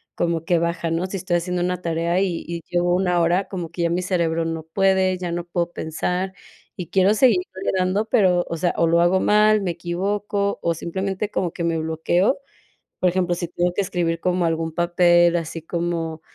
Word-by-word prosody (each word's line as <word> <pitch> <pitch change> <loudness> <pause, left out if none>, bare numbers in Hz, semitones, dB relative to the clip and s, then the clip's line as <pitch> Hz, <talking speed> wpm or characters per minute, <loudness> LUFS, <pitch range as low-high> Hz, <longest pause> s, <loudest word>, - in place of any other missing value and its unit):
como 165 -1 -1
que 170 -1 +2
baja, 170 0 -1
¿no? 170 +3 -1
Si 195 - -4
estoy 175 -1 0
haciendo 180 +1 -2
una 180 0 -2
tarea 170 +1 0
y 180 -4 -2
y 170 0 -4
llevo 175 0 +1
una 180 -1 +1
hora, 175 +3 +1
como 180 -4 -4
que 175 - -5
ya 170 - +2
mi 175 +1 0
cerebro 165 -3 0
no 165 -1 -3
puede, 190 +2 +2
ya 180 -1 -4
no 175 0 -3
puedo 175 0 -2
pensar 180 +4 -2 0.5
y 180 -4 -5
quiero 190 +2 +4
seguirle 225 -7 +4 0.4
dando, 185 +3 +1
pero, 180 -3 +3
o - - -2
sea, 175 +1 0
o 170 - +3
lo 170 +1 +3
hago 180 +2 +3
mal, 215 0 +4
me 185 -3 -1
equivoco, 200 +4 -2
o 170 - +1
simplemente 190 +5 -3
como 175 -3 -1
que 170 - -4
me 165 -1 0
bloqueo. 160 - +1 0.6
Por 180 - +3
ejemplo, 180 -1 0
si 175 0 -4
tengo 175 0 0
que - - +1
escribir 170 -3 -1
como 180 -1 +1
algún 165 0 -1
papel, 175 0 +4
así 165 -1 -3
como, 165 -1 -3
175 Hz, 200 wpm, -22 LUFS, 170-185 Hz, 0.6 s, quiero